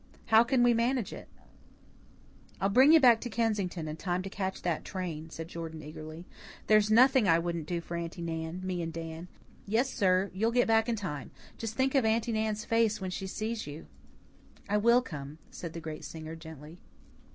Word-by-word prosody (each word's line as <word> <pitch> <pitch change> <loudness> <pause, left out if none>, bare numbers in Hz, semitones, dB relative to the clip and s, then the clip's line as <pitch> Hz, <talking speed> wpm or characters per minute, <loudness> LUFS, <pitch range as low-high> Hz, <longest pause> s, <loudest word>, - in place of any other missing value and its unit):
How 220 +1 +9
can 250 0 +2
we 245 0 +5
manage 235 0 0
it?" - - -9 1.3
"I'll 195 - +1
bring 260 +8 +6
you 325 - +8
back 240 -5 +6
to 245 - -4
Kensington 200 -7 -1
in 155 +1 -5
time 180 +1 -2
to 195 - -7
catch 190 -1 -4
that 170 -3 -1
train," 165 -5 -5
said 165 0 -7
Jordan 165 -2 -7
eagerly. 155 +2 -9 0.4
"There's 215 -1 +4
nothing 255 0 +5
I 165 -2 +5
wouldn't 170 -2 -3
do 170 0 -2
for 170 - -6
Aunty 170 +1 -5
Nan 165 +1 -4
me 180 -2 -2
and 165 -1 -3
Dan. 165 +1 -7 0.4
Yes, 235 +6 +1
sir, 185 0 +2
you'll 215 +4 +1
get 245 +1 +3
back 225 0 +3
in 235 - +1
time. 165 -10 -5 0.3
Just 225 -1 -4
think 265 +1 +1
of 270 -3 +3
Aunty 225 +1 +1
Nan's 215 -1 -1
face 225 -2 +2
when 190 -2 -4
she 190 +1 -4
sees 220 +2 -4
you!" 150 +3 -8 0.8
"I 205 +1 +1
will 235 +4 +4
come," 145 - -8
said 170 -2 -7
the 170 - -5
great 155 -1 -7
singer, 160 0 -7
gently. 160 0 -11
190 Hz, 195 wpm, -30 LUFS, 165-225 Hz, 1.3 s, How